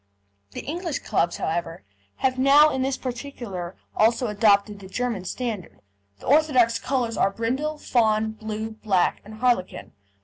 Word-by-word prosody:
The - - -5
English 335 0 -3
clubs, 175 -5 0
however, 165 -2 -3 0.3
have 260 -1 0
now 285 +3 +6
in 265 - -1
this 265 0 0
particular 235 -9 -6 0.2
also 230 +3 +3
adopted 210 -1 +2
the 190 - -11
German 225 -2 -3
standard. 220 -2 -5 0.4
The - - -14
orthodox 255 -6 +4
colours 245 -4 -1
are - - +3
brindle, 260 +9 -2
fawn, 220 -5 +1
blue, 220 0 -5
black, 210 -4 0
and 215 +1 -11
harlequin. 235 -5 0
230 Hz, 140 wpm, -24 LUFS, 205-260 Hz, 0.4 s, now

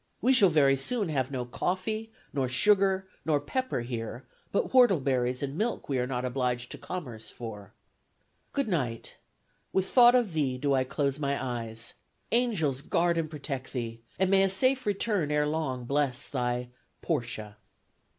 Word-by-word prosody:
We 260 +3 +4
shall 210 -7 +7
very 140 -4 +4
soon 210 - 0
have 135 -4 0
no 130 -3 -3
coffee, 190 - -2 0.2
nor 135 -2 0
sugar, 190 +7 +3 0.2
nor 150 -2 +2
pepper, 255 - -2
here; 120 +1 -5 0.3
but - - 0
whortleberries 135 - +3
and 140 0 -3
milk 225 +7 -2
we 135 -3 0
are 125 - 0
not 125 -1 -2
obliged 125 -1 -1
to - - -7
commerce 125 -12 -6
for.... 105 -5 -8 0.8
Good 280 -4 0
night. 130 - -2 0.5
With 190 0 +1
thought 245 -1 +7
of 235 -8 +2
thee 140 -5 0
do 140 +2 +1
I 130 -1 +2
close 140 +1 -1
my 140 -1 0
eyes. 115 -3 -3 0.4
Angels 195 - +1
guard 170 +3 +1
and 160 -1 -2
protect 140 -3 -5
thee; 115 -3 -4 0.2
and 190 +1 +2
may 195 0 +6
a 195 - +4
safe 255 +6 +2
return 205 -5 0
ere 150 0 +2
long 150 -5 -2
bless 140 -1 0
thy 125 -2 -2 0.3
"PORTIA." 115 -8 -3
140 Hz, 160 wpm, -29 LUFS, 125-190 Hz, 0.8 s, shall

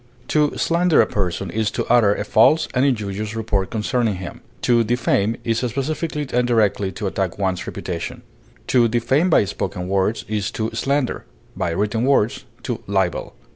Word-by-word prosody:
To 150 -1 +2
slander 170 0 +3
a - - +6
person 95 -2 -2
is 110 +2 0
to - - 0
utter 115 -4 +4
a - - -3
false 150 +8 +4
and 125 - +2
injurious 105 -4 -1
report 105 -4 -1
concerning 115 -1 0
him; 90 -1 -8 0.2
to 120 -1 +4
defame 115 -2 +1
is 115 -1 0
specifically 145 +4 -2
and 125 0 +2
directly 105 -4 +2
to 105 - -5
attack 95 -2 -2
one's 95 -2 -1
reputation; 85 -3 -5 0.4
to 120 -2 +4
defame 120 +9 +1
by 155 - +4
spoken 90 -1 -4
words 100 +3 0
is 105 -2 -1
to 110 0 -1
slander, 140 -2 -1 0.3
by 90 -2 -1
written 105 +6 -1
words, 130 -5 +2 0.2
to - - -3
libel. - - -1
110 Hz, 165 wpm, -21 LUFS, 100-125 Hz, 0.4 s, a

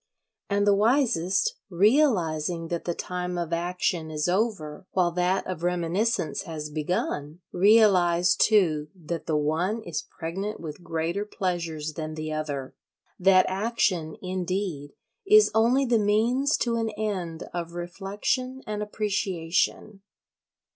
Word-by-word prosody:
And 200 0 +2
the 205 - +5
wisest, 210 - +2
realising 175 - +2
that 170 -1 -3
the 175 - -1
time 180 0 -4
of 170 -1 -3
action 175 -1 -1
is 150 0 -1
over 185 -4 -1
while 180 -2 +2
that 180 +2 0
of 185 -3 -5
reminiscence 175 -1 0
has 155 -5 -6
begun, 150 0 -3
realise 180 -4 +4
too 165 -9 +3
that 170 -1 -6
the 155 - +1
one 170 +9 0
is 170 -6 -3
pregnant 195 +6 -5
with 155 +1 -8
greater 165 +4 -2
pleasures 170 -6 -3
than 155 0 -5
the 155 0 -4
other—that 155 +5 0
action, 190 -5 0
indeed, 180 -5 -3 0.3
is 425 +1 +7
only 240 +5 +3
the 235 -3 +3
means 235 +8 +2
to 235 -1 0
an 225 -1 -1
end 185 -6 -3
of 170 -1 -4
reflection 205 +9 -3
and 210 0 -4
appreciation. 195 -1 -1
180 Hz, 125 wpm, -26 LUFS, 165-210 Hz, 0.3 s, is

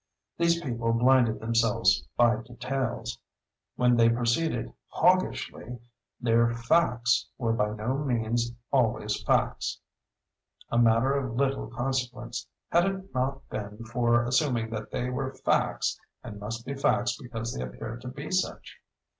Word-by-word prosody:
These 170 0 +2
people 115 -6 -1
blinded 120 -1 +4
themselves 110 -5 +2
by 120 -2 +5
details. 120 -1 -4 0.6
When 125 -1 +3
they 115 0 +6
proceeded 120 +2 0 0.2
Hoggishly, 175 -8 +1 0.4
their 115 -1 +3
"facts" 120 -2 +2
were 115 -3 0
by 105 -2 0
no 120 +6 -2
means 120 -3 0 0.2
always 110 -5 +1
facts—a - - +1 1.0
matter 115 +3 +4
of 130 -4 -2
little 135 +1 0
consequence 125 -2 -3 0.2
had 175 +1 +4
it 195 0 -4
not 135 +1 -2
been 105 +2 -6
for 120 0 +2
assuming 125 -3 +1
that 110 -1 -5
they 125 +1 -2
were 130 +1 -3
facts 130 - 0 0.2
and 105 - -8
must 115 +3 -5
be 140 - -3
facts 120 -3 +1
because 115 -2 -5
they - - -4
appeared 110 - -7
to 125 - -8
be 140 +4 -7
such. 185 0 -2
120 Hz, 130 wpm, -28 LUFS, 115-130 Hz, 1.0 s, they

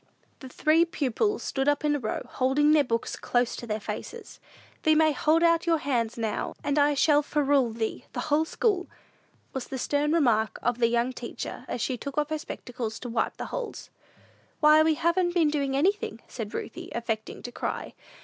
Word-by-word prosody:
The 260 - -9
three 310 +5 +3
pupils 340 - -1
stood 270 0 -1
up 290 +1 +2
in 295 0 +3
a - - -1
row, 220 -4 -3
holding 275 +4 +2
their 305 -1 +5
books 230 -3 -2
close 245 -1 0
to 240 - -8
their 215 0 -2
faces. 465 - -7 0.4
"Thee 315 -1 +4
may 315 0 +5
hold 310 +4 +2
out 335 0 +3
your 330 -1 +4
hands 240 -6 -1
now, 220 -2 -2
and 290 0 +1
I 290 0 +4
shall 295 +1 +4
ferule 285 -4 +2
thee 220 0 -3
the - - -2
whole 305 0 +2
school," 370 0 0 0.7
was 265 -2 -4
the 265 - -5
stern 290 +3 0
remark 235 -9 +2
of 245 0 0
the 230 - +4
young 240 +2 +1
teacher, 240 -1 -6
as 240 - -3
she 255 +1 -1
took 280 +4 -7
off 300 +1 0
her 310 - -1
spectacles 240 -6 -6
to 245 - -5
wipe 230 - -1
the - - -4
holes. - - -5 0.7
"Why, 305 0 +7
we 315 0 +3
haven't 350 +2 +1
been 320 -4 +3
doing 280 -2 0
anything," 360 - 0
said 220 -4 -6
Ruthie, - - -6
affecting 225 -2 -3
to 245 - -6
cry. - - -4
285 Hz, 195 wpm, -27 LUFS, 240-315 Hz, 0.7 s, Why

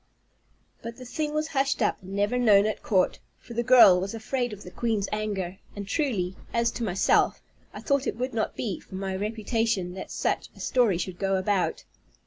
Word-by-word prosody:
But 230 0 -7
the 255 - -10
thing 300 +4 -3
was 305 +1 -1
hushed 275 -1 0
up, - - 0
and 190 +1 -8
never 205 +5 +1
known 210 -4 +5
at 215 - -2
court, 190 -3 +1 0.2
for 235 - -12
the 235 - 0
girl 240 -7 +7
was 195 +4 -4
afraid 245 +2 -2
of 205 -1 -9
the 180 - -10
queen's 215 -2 -1
anger; 200 -4 -3 0.2
and 200 -1 -6
truly, 195 - -1 0.2
as 235 0 +1
to 240 - -5
myself, 190 -3 +2 0.3
I - - -9
thought 280 -2 +1
it - - -2
would 255 +1 -3
not 220 -1 -1
be 205 -6 -3
for 190 - -12
my 190 0 -3
reputation 215 -2 -1
that 190 - -7
such - - -1
a - - -16
story 235 -8 +2
should 180 0 -5
go 195 -1 +1
about. 190 0 0
215 Hz, 200 wpm, -26 LUFS, 190-240 Hz, 0.3 s, girl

